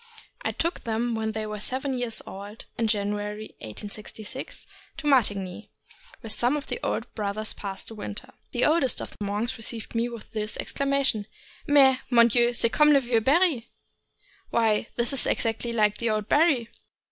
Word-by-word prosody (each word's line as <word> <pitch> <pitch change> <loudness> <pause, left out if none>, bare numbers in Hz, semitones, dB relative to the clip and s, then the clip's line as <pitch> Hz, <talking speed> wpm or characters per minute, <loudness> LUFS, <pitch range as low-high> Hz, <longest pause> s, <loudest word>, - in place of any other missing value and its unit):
I - - -1
took 335 +2 -2
them 235 +1 0
when 220 -1 -1
they 220 0 -2
were 210 0 -5
seven 260 +5 -1
years 245 -3 -1
old, 205 +3 -9
in 230 - +1
January, 210 0 -2
1866, 210 - -7 0.3
to 320 - -7
Martigny, 210 -7 +1 0.5
where 225 - -7
some 245 +7 +2
of 290 - -5
the - - -3
old - - -2
brothers 215 0 -3
pass 195 -2 -6
the - - -9
winter. 210 -1 -7 0.2
The 245 - +2
oldest 300 -5 +3
of - - -6
the - - -6
monks 210 +5 -2
received 225 0 -5
me 230 +1 +1
with 235 -2 -10
this 215 -1 -3
exclamation: 275 -6 0 0.4
"Mais, 270 -3 +6
mon 235 -2 +6
Dieu, 240 +1 +3
c'est 230 -1 +2
comme 300 0 +6
le 280 - +5
meux 240 -2 +2
Barry! 285 -2 +3 0.4
" - - -34
(Why, 225 -1 +2
it 240 +3 +1
is 275 - +3
exactly 230 +1 0
like 210 -2 +2
the 235 - +1
old 215 -1 0
Barry! 290 -7 +3
230 Hz, 175 wpm, -26 LUFS, 210-260 Hz, 0.5 s, Mais